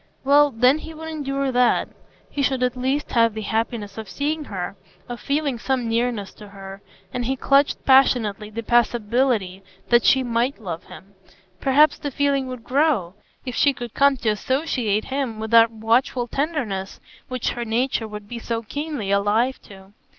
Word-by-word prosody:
Well, 290 +2 +5
then, 255 +4 +3
he 320 0 -9
would 320 +1 -7
endure 275 -3 -2
that; 250 -1 +2 0.4
he 285 - -4
should 265 -2 +1
at 250 0 0
least 265 +4 -2
have 230 -2 +3
the 220 - -4
happiness 220 -1 -3
of 220 -3 -8
seeing 300 +6 -2
her, 190 -3 -5 0.3
of 240 -1 -6
feeling 280 -4 -1
some 255 -1 -1
nearness 230 -3 -1
to 210 - -11
her. 195 0 -10 0.3
And 245 -1 -2
he 265 +3 0
clutched 275 +2 +2
passionately 230 -6 +3
the 230 +2 -6
possibility 235 -4 +1 0.3
that 240 -1 +5
she 265 -1 +4
might 240 +2 -1
love 175 -6 -6
him; 200 +1 -14 0.5
perhaps 285 +5 +4
the 290 - -3
feeling 280 -1 0
would 255 -2 -7
grow, 260 - +1 0.3
if 250 - -4
she 280 +4 +3
could 240 -3 -8
come 280 -1 +3
to 235 -2 -1
associate 225 -1 -1
him 265 -5 -3
with 220 0 -5
that 230 0 +7
watchful 230 +2 0
tenderness 245 - -3 0.3
which 255 -2 -2
her 240 - -4
nature 235 0 -1
would 210 -1 -9
be 235 +2 -6
so 230 0 -3
keenly 285 -4 -4
alive 210 +6 +1
to. 195 0 -15
240 Hz, 170 wpm, -22 LUFS, 220-275 Hz, 0.5 s, that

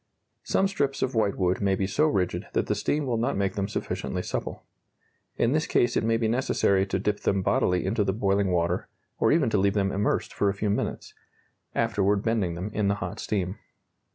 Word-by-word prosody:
Some 195 - +1
strips 140 -8 -1
of 130 - -1
whitewood 100 -5 +1
may 100 -1 +2
be 95 - -1
so 150 +11 +2
rigid 95 - -1
that - - +1
the - - 0
steam 150 0 -1
will 120 -3 0
not 120 +2 0
make 100 -1 0
them 100 -1 -2
sufficiently 105 - -3
supple. - - -4 0.7
In 115 - +2
this 155 +2 +1
case 120 0 +2
it - - +1
may 115 0 +2
be 115 -1 0
necessary 110 -5 +2
to 95 - -1
dip 100 +2 -1
them 100 -1 0
bodily 90 0 +1
into 105 +2 +1
the 95 - +1
boiling 100 -1 +1
water, 85 0 0 0.3
or - - +3
even 145 -8 +3
to 105 - +2
leave 100 +1 +2
them 100 -1 +1
immersed 100 +2 -1
for 100 - +1
a 100 - -2
few 105 0 -1
minutes; - - -3 0.6
afterward 100 0 +1
bending 105 -7 0
them 95 +5 -5
in 105 -1 0
the 100 - +2
hot 105 - -5
steam. 95 -2 -2
100 Hz, 210 wpm, -26 LUFS, 95-115 Hz, 0.7 s, or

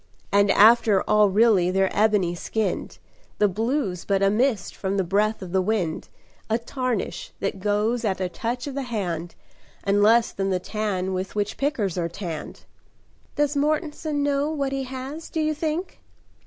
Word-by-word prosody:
And 200 0 +4
after 215 -1 +5
all 210 -1 +4
really 200 -3 +4
they're 190 +1 +1
ebony 205 -5 +2
skinned: 195 +3 -3 0.4
The 210 - +4
blue's 215 - -1
but 195 -1 +1
a 195 - +4
mist 225 -3 0
from 195 0 -2
the 190 - +2
breath 205 +3 0
of 180 - -8
the 190 0 +2
wind, 185 -5 -1 0.4
A 220 - +2
tarnish 245 -2 -3
that 195 0 -2
goes 210 +4 0
at 195 -4 0
a 185 - 0
touch 240 +7 -4
of 285 - -5
the 280 - -2
hand, 180 -9 -4 0.5
And 200 +1 +2
less 225 +2 +5
than 195 0 -2
the 185 - +1
tan 190 -2 -2
with 185 +2 -4
which 205 -1 -1
pickers 215 - -1
are 170 -1 -1
tanned." 170 -3 -7 0.7
"Does 295 0 +1
Mortenson 300 0 -1
know 285 +1 +1
what 280 -3 -2
he 270 -1 -2
has, 265 +5 -7
do 320 - -3
you 310 0 +1
think?" 315 +4 -3
210 Hz, 170 wpm, -24 LUFS, 190-265 Hz, 0.7 s, after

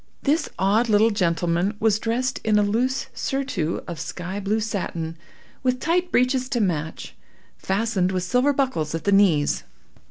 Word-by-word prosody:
This 300 +4 +1
odd 215 +5 +2
little 215 +2 +4
gentleman 175 0 0
was 220 -1 +2
dressed 245 +3 -1
in 215 -1 +3
a 210 - +4
loose 240 +6 0
surtout 265 - -2
of 170 -2 -6
sky 185 +3 -5
blue 205 +2 0
satin, 175 -6 -3 0.5
with 255 -1 0
tight 350 +4 0
breeches 255 0 +2
to 245 - 0
match, 160 -6 -2 0.4
fastened 195 -2 0
with 185 -1 -1
silver 250 +9 +2
buckles 255 - -1
at 165 - -4
the 200 - +1
knees. 185 -8 +3
210 Hz, 155 wpm, -23 LUFS, 180-250 Hz, 0.5 s, little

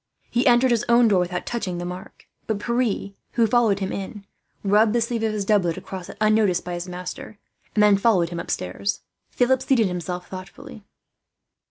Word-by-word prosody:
He 245 +4 +2
entered 245 +1 +5
his 235 -2 +2
own 235 0 +6
door 200 -4 +3
without 180 0 -2
touching 200 -7 -3
the 175 - -4
mark; 180 +1 -9 0.2
but 220 - 0
Pierre, 235 -2 -1 0.2
who 235 -1 +3
followed 225 -3 +3
him 190 -1 -3
in, 200 +1 -6 0.4
rubbed 210 +2 +4
the 240 - +3
sleeve 230 0 -1
of 220 -1 +1
his 210 -2 -3
doublet 190 -5 +2
across 185 -2 -8
it, - - -10
unnoticed 215 -4 +2
by 180 - -4
his 175 +1 -5
master, 180 +4 -7 0.4
and 210 - +4
then 205 -1 +6
followed 195 -5 +2
him 170 -1 -5
upstairs. 130 - -3 0.3
Philip 255 +1 +2
seated 245 -5 +3
himself 180 -1 -4
thoughtfully. 185 +3 -10
205 Hz, 185 wpm, -23 LUFS, 180-230 Hz, 0.4 s, own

